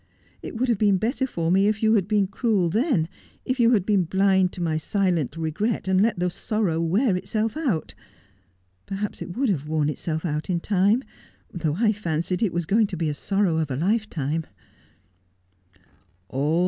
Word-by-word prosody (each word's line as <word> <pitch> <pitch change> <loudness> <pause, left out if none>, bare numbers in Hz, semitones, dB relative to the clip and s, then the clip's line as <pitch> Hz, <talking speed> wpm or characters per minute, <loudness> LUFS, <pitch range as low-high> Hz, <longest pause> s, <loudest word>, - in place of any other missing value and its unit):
It - - -7
would 255 +3 0
have 235 -5 +1
been 205 -3 +4
better 250 +6 -1
for 170 -8 -1
me 195 +2 +4
if 215 +1 0
you 220 0 +4
had 200 -4 +2
been 205 -2 +2
cruel 200 -2 0
then, 215 - +1 0.4
if 255 0 -1
you 235 -1 +5
had 200 -5 +2
been 200 -4 +2
blind 190 +1 +2
to - - -8
my 165 -2 0
silent 170 - 0
regret, 175 +7 -2
and 190 0 +3
let 225 -1 +2
the 180 +1 0
sorrow 200 -5 -1
wear 190 +6 +2
itself 215 +5 -2
out. 200 - -1 0.9
Perhaps 200 +1 -4
it 175 - -6
would 265 -1 +1
have 150 -7 -1
worn 155 -1 +1
itself 160 +2 -3
out 150 0 -3
in 175 -2 +1
time: 205 +7 +2 0.5
though 160 -4 -1
I 215 +3 +3
fancied 180 -2 -2
it 215 -6 +2
was 175 0 -2
going 215 +5 +3
to 190 - -6
be 160 -1 0
the - - -1
sorrow 195 +1 0
of 155 -2 -1
a 130 - -2
lifetime.' 165 - -1
190 Hz, 185 wpm, -24 LUFS, 165-215 Hz, 0.9 s, you